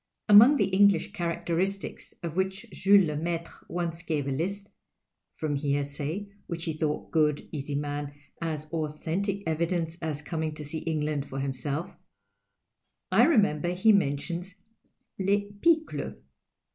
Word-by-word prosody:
Among 230 +7 +9
the 205 - +3
English 200 -1 +4
characteristics 175 +1 -2
of 165 -2 -4
which 190 +4 -1
Jules 195 +1 +5
Lcniaitre 165 +2 -2 0.2
once 170 -1 -2
gave 155 -5 -2
a - - -1
list 195 +8 -3 0.6
(from 155 -2 -2
hearsay, 145 +6 -2 0.2
which 170 -2 -4
he 160 - -2
thought, 155 -1 -2
good, 150 -2 +2
easy 145 -1 -4
man, 145 0 -3 0.3
as 155 -2 -3
authentic 165 +6 -2
evidence 165 +1 -1
as 155 -2 -3
coming 160 -1 -3
to 150 - -7
see 155 +2 -4
England 150 -3 -1
for 135 - -4
himself) 140 +4 -3 1.2
I - - +6
remember 180 - +3
he 190 +5 +5
mentions 175 +1 0 0.3
" - - -40
Les 205 +1 +1
pickles. 325 -1 +2
165 Hz, 135 wpm, -28 LUFS, 150-190 Hz, 1.2 s, Among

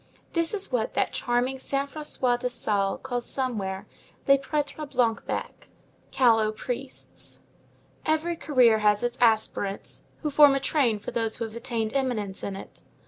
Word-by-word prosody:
This 335 -1 +1
is 390 -6 -3
what 235 -3 -1
that - - +1
charming 250 +2 0
Saint 275 +1 -2
François 255 -5 0
de 250 0 -1
Sales 205 -5 -1
calls 245 -2 -2
somewhere 205 -8 -2 0.4
"les 275 0 +6
prêtres 290 +1 -3
blancs 240 -4 +1
becs," - - -4 0.4
callow 225 -4 +4
priests. 245 +4 -7 0.6
Every 315 +2 0
career 250 -8 +4
has 210 +1 +3
its 240 +1 -2
aspirants, 215 -3 +1 0.2
who 300 - -1
form 285 -1 +7
a - - +1
train 265 -6 +1
for 205 - -7
those 225 -2 -1
who 230 - -2
have 220 0 -9
attained 230 -2 -3
eminence 240 -8 -1
in 195 - -4
it. 195 - -10
245 Hz, 155 wpm, -26 LUFS, 220-275 Hz, 0.6 s, form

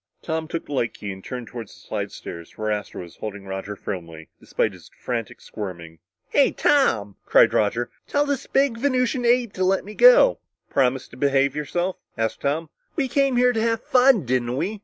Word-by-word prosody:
Tom 160 -1 -2
took 165 +1 -4
the 145 - -7
light 120 -4 -1
key 105 - -6
and 95 0 -10
turned 125 -2 -6
toward 115 -1 -8
the - - -16
slidestairs 85 -1 -7
where 110 0 -1
Astro 105 -3 -4
was 85 - -14
holding 105 -2 -6
Roger 95 +1 -5
firmly, 85 -5 -7
despite 110 - -1
his 90 -3 -15
frantic 115 -4 -4
squirming. 85 -6 -8 0.3
"Hey, - - +4
Tom," 100 -2 +2
cried - - +5
Roger, 115 +3 +1 0.2
"tell 290 0 +1
this 285 -2 -2
Venusian 255 -1 +1
ape 240 -2 +3
to 185 - -1
let 190 +1 +2
me 210 - -8
go!" - - +7 0.3
"Promise 130 -1 +1
to 125 - -13
behave 140 0 +2
yourself?" 175 +5 -2 0.2
asked 110 -1 -2
Tom. 155 +4 -1 0.2
"We 285 -5 0
came 275 0 +2
here 250 0 +4
to 225 - 0
have 230 0 0
fun, 250 - +4
didn't 125 0 0
we?" 210 +8 -2
135 Hz, 185 wpm, -23 LUFS, -, 0.3 s, go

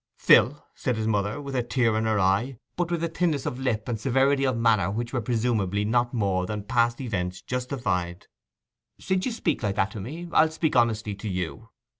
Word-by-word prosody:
'Phil,' 140 +7 +4
said 125 -3 -2
his 110 - -2
mother, 105 +1 0
with 140 -2 -6
a 125 - +2
tear 120 -2 +1
in 110 +1 0
her 110 -1 +1
eye, 100 +7 +1 0.2
but 175 -1 -1
with 170 -1 -1
a - - +2
thinness 165 -4 -1
of 125 - -3
lip 115 -5 -1
and 115 -3 -2
severity 135 +3 +2
of 130 -3 +1
manner 115 -4 +3
which 120 +5 -3
were 125 - 0
presumably 110 -4 0
not 120 +2 +1
more 95 -6 0
than 105 0 -4
past 120 +1 +1
events 90 -8 -3
justified; 120 -9 -2 0.7
'since 185 +3 -1
you - - -1
speak 170 - -1
like 100 -2 -1
that 95 - +1
to 110 - -7
me, 160 - -6
I'll 160 0 +5
speak 160 -2 -1
honestly 110 -3 +2
to 100 +2 -6
you. 95 +5 -4
115 Hz, 205 wpm, -26 LUFS, 105-135 Hz, 0.7 s, I'll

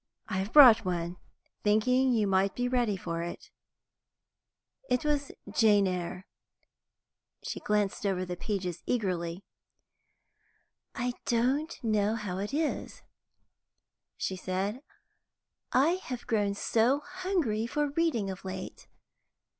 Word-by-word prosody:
"I 190 -4 -2
have 195 +3 -3
brought 245 -7 +9
one, 175 -1 -2 0.5
thinking 250 +5 +3
you 220 -3 +2
might 195 0 +2
be 245 0 0
ready 240 -5 +1
for 165 -2 -4
it." 170 0 -7 1.4
It 250 +3 +1
was 290 -2 0 0.2
"Jane 210 -3 +4
Eyre." 180 0 -3 1.2
She - - -4
glanced 210 -2 0
over 190 -2 0
the 180 0 -4
pages 180 -2 -3
eagerly. 180 -5 -2 1.5
"I 245 +1 -1
don't 265 +7 +1
know 215 -1 +1
how 200 -5 -4
it 205 +3 -3
is," 305 +2 -2 1.1
she 190 - -2
said, 190 +6 -3 0.9
"I 310 +8 +3
have 250 -1 -5
grown 205 -3 0
so 235 +7 +2
hungry 345 - -1
for 295 +3 -1
reading 285 -11 0
of 190 - -9
late. 185 -1 -7
215 Hz, 115 wpm, -29 LUFS, 190-250 Hz, 1.5 s, brought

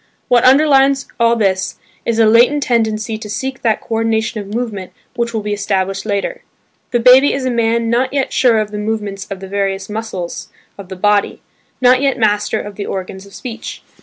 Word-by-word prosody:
What 245 -1 +4
underlies 275 0 +4
all 235 0 +4
this 190 -4 0 0.3
is 230 -1 0
a 225 - +5
latent 240 +6 +4
tendency 220 -2 -1
to 215 -1 -8
seek 265 +5 -4
that 225 -2 +1
coordination 225 0 -1
of 200 0 -10
movement 215 -5 -4 0.2
which 235 -1 -1
will 220 -2 -3
be 210 0 -2
established 195 -1 -2
later. 200 -1 -2 0.5
The 240 - +1
baby 255 +4 +6
is 270 -1 -2
a 255 - 0
man 230 0 +1
not 255 +2 +1
yet 275 -1 -1
sure 240 -3 +3
of 215 -1 -1
the 210 - -4
movements 210 -2 -4
of 195 -2 -6
the 190 - -7
various 195 0 -2
muscles 210 -5 -5 0.3
of 195 -2 -11
the 190 - -6
body; 205 +2 +1 0.4
not 255 +1 +5
yet 275 -1 +1
master 210 -2 +1
of 205 -1 -8
the 200 - -4
organs 190 +1 -6
of 200 - -15
speech. 240 -3 -7
220 Hz, 195 wpm, -16 LUFS, 200-240 Hz, 0.5 s, baby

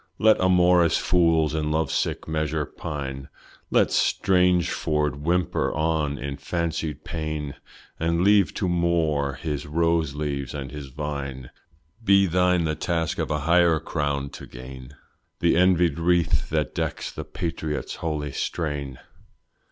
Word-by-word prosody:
Let 110 -2 +4
amorous 90 -2 +4
fools 80 -3 +2
in 75 -1 -1
love 80 -1 0
sick - - -1
measure 80 -1 -1
pine; 70 -2 -6 0.4
Let - - +3
Strangford 90 -6 +2
whimper 85 +4 0
on, 80 -2 0
in 70 +1 -5
fancied 80 0 -3
pain, 75 -3 -4 0.5
And 85 +2 +1
leave 100 -1 +4
to 95 - -1
Moore 80 -5 +1
his 75 0 -4
rose 80 -1 +1
leaves 70 -3 -3
and 70 -2 -5
his 75 -1 -7
vine; 70 -2 -5 0.5
Be 100 -2 +5
thine 90 0 +2
the 80 -1 0
task 80 +1 -2
a 75 -1 -1
higher 85 +1 +4
crown 70 -3 -2
to - - -10
gain, 65 +2 -10 0.4
The - - +3
envied 90 -3 +3
wreath 85 0 +1
that - - -1
decks - - -3
the - - -6
patriot's 80 -4 -4
holy 75 -3 -3
strain. 70 -3 -3
80 Hz, 130 wpm, -25 LUFS, 75-85 Hz, 0.5 s, Be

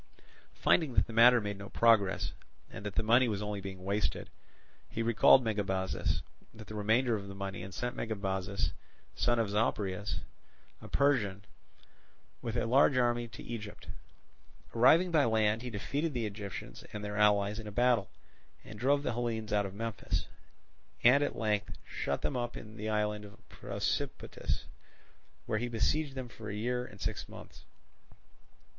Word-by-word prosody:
Finding 150 -8 +2
that - - +4
the 115 - -9
matter 120 +2 +7
made 100 -2 -4
no 100 - -8
progress, 110 -5 +3 0.4
and - - -8
that 105 - -6
the - - +1
money 120 +3 +5
was 105 -2 -2
only 105 -1 -3
being 95 -1 -7
wasted, 100 +1 -1 0.6
he 115 - -2
recalled 115 +3 +6
Megabazus 95 -4 -1 0.3
with 110 -1 -11
the - - -7
remainder 110 +3 +2
of 100 -2 -5
the 100 - -8
money, 95 -2 -5
and 95 +2 -7
sent 120 +5 -3
Megabuzus, 100 -3 -2 0.4
son 120 0 +1
of 110 -3 0
Zopyrus, 105 -2 -1 0.6
a - - -9
Persian, 105 -9 +1 1.0
with 115 0 -3
a - - +1
large 130 +3 +4
army 120 -1 +2
to - - -10
Egypt. 110 -3 -7 0.8
Arriving 160 +10 +5
by 155 -3 +4
land 110 -1 +2
he 125 - -5
defeated 140 +8 -2
the 120 -2 0
Egyptians 100 - -7
and 105 -1 -5
their 105 0 -4
allies 105 0 +3
in 110 - -7
a - - -6
battle, 120 -2 +2 0.5
and 105 - -10
drove 140 +4 +2
the - - -1
Hellenes 110 -2 -2
out 100 -1 +2
of 95 - -10
Memphis, 115 0 -3 0.8
and 135 +4 +6
at - - -2
length 105 -2 -1
shut - - -3
them 140 - -1
up 120 -1 -3
in 110 0 -10
the 110 0 -4
island 105 -1 0
of 100 -1 -15
Prosopitis, - - -3 0.8
where 110 - 0
he 120 - -2
besieged 135 +6 0
them 130 -2 -4
for 110 -2 -9
a 100 - -4
year 125 +3 -1
and 100 - -14
six - - -4
months. - - -12
110 Hz, 165 wpm, -32 LUFS, 100-120 Hz, 1.0 s, matter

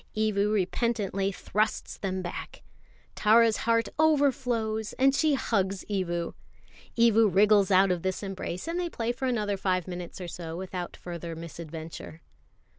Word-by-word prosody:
Evu 210 -1 +1
repentantly 200 -1 0
thrusts 215 +3 -1
them 190 -1 -3
back. 175 - -7 0.5
Tara's 225 +1 +4
heart 230 0 +3
overflows, 250 -8 +1
and 265 +1 +3
she 300 +1 +3
hugs 195 -6 -1
Evu. 175 -4 -1 0.6
Evu 225 -1 +5
wriggles 200 +1 +4
out 190 0 +5
of 175 -2 -1
this 190 +2 -2
embrace, 195 - -5
and 335 +1 -2
they 350 -1 -1
play 235 -6 -2
for 265 +2 -4
another 210 -5 0
five 185 -2 0
minutes 180 0 -6
or 180 - -5
so 165 -1 -6
without 180 -1 -5
further 170 -1 -6
misadventure. 165 0 -8
200 Hz, 140 wpm, -28 LUFS, 180-230 Hz, 0.6 s, Evu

